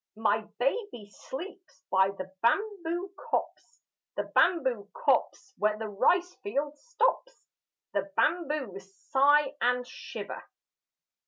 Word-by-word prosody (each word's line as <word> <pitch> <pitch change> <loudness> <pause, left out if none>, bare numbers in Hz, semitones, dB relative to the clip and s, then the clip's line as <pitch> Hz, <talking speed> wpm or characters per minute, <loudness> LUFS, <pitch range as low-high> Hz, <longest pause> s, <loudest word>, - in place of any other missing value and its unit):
My 220 -1 +2 0.2
baby 260 - -1
sleeps 340 - -9
by 190 0 +5
the 190 -1 -7
bamboo 365 - 0 0.2
copse 475 - -3 0.3
The - - 0
bamboo 255 - +3
copse 260 -1 +1
where 210 0 +2
the 220 0 -4
rice 350 - +2
field 295 -7 -2
stops: - - 0 0.5
The 300 - -1
bamboos 265 - 0 0.2
sigh 285 +1 +5
and 250 0 +2
shiver. - - -7
275 Hz, 105 wpm, -29 LUFS, 215-355 Hz, 0.5 s, by